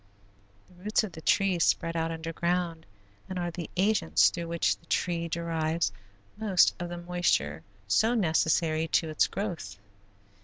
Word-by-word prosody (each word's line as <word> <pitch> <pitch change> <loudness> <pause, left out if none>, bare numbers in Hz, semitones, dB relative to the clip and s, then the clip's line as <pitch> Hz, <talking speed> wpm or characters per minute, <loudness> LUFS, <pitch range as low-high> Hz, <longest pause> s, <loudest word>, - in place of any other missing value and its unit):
The 185 - -21
roots 215 +2 +2
of 210 - -5
the 160 - -10
tree 195 +1 +2
spread 165 0 +1
out 165 0 0
underground 165 +1 -2 0.4
and 185 - -4
are 175 -1 -2
the 170 -1 -6
agents 190 -3 +3
through 170 -1 -5
which 170 0 +1
the 170 - -26
tree 170 -1 0
derives 165 -4 -1 0.5
most 205 -5 +4
of 175 - -3
the 175 - -5
moisture 175 - 0 0.3
so 220 - +3
necessary 160 -4 +2
to 160 0 +1
its 155 - +2
growth. 165 - -5
170 Hz, 150 wpm, -28 LUFS, 160-180 Hz, 0.5 s, most